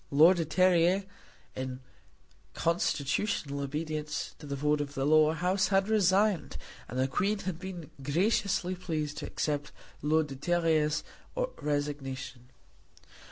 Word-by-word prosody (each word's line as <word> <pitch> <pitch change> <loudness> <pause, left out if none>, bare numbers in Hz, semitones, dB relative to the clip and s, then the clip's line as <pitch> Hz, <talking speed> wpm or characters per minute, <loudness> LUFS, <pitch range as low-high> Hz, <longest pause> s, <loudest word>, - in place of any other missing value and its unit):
Lord 160 +6 +6
de 165 - 0
Terrier, 185 +2 +3 0.5
in 130 0 -4 0.8
constitutional 150 -2 0
obedience 150 +2 -3
to 150 - -10
the 140 - -3
vote 150 +1 +1
of 145 -1 -5
the 135 - 0
Lower 155 +1 +5
House, 185 +3 +1
had 195 0 +2
resigned, 200 -2 +2 0.3
and 125 - -6
the 130 +1 +2
Queen 200 +10 0
had 185 -4 -4
been 180 -4 -7
graciously 185 - +1
pleased 155 -5 -3
to - - -5
accept 145 -1 -2 0.3
Lord 155 +1 +2
de 140 -2 -8
Terrier's 155 -1 +1 0.6
resignation. 135 -4 -3
155 Hz, 125 wpm, -30 LUFS, 145-180 Hz, 0.8 s, Lord